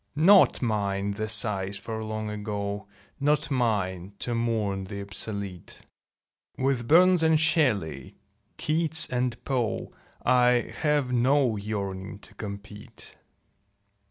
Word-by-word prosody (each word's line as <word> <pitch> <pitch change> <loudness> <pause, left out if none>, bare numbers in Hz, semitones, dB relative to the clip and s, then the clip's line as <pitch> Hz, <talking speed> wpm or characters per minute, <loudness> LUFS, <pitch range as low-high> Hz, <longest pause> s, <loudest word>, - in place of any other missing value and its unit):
Not 185 0 +5
mine 100 -3 -1
the 110 +2 -3
sighs 100 -3 0
for 110 +1 -5
Long 110 0 -4
Ago; 105 -1 -4 0.3
Not 150 +2 +1
mine 100 -7 -1
to 120 - -3
mourn 110 -5 -1
the 100 +1 -7
obsolete; 100 -2 -6 0.7
With 130 -3 0
Burns 180 +3 +6
and 160 -1 +4
Shelley, 110 - +1 0.4
Keats 160 0 +2
and 125 -1 -1
Poe 125 -6 -2 0.3
I 125 -1 +3
have 145 -5 +1
no 125 0 +3
yearning 100 -2 -4
to - - -13
compete. 105 0 -9
110 Hz, 110 wpm, -27 LUFS, 100-135 Hz, 0.7 s, Burns